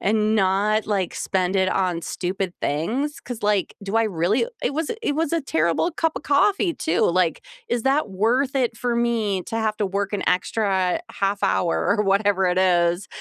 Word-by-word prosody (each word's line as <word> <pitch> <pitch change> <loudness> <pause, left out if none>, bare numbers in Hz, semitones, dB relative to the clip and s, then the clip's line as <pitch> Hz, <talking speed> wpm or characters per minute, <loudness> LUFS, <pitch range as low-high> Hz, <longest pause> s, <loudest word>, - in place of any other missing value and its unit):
and 215 +1 +1
not, 205 +2 +2
like, 195 -4 -1
spend 185 -1 -1
it 190 0 +2
on 180 -3 0
stupid 185 0 -3
things, 235 - -2
'cause, 245 -2 -7
like, 205 -3 +1
do 200 - -4
I 225 - +4
really 185 - +1 0.2
it 280 - -1
was 320 0 -2
it 290 - 0
was 320 0 -1
a 335 - +1
terrible 170 - 0
cup 325 -1 -1
of - - -4
coffee 360 +4 +2
too, 165 - 0
like, 175 -2 +1 0.3
is 240 -1 -1
that 270 -5 +1
worth 250 +8 +1
it 240 -3 0
for 240 0 -1
me 225 -5 0
to - - -7
have 220 -1 -1
to 210 - 0
work 200 +1 -2
an 205 - -1
extra 190 - +1
1/2 200 0 -1
hour 170 -2 +1
or 210 - +2
whatever 195 -1 +2
it 180 0 +1
is 175 0 +2
205 Hz, 190 wpm, -23 LUFS, 185-240 Hz, 0.3 s, I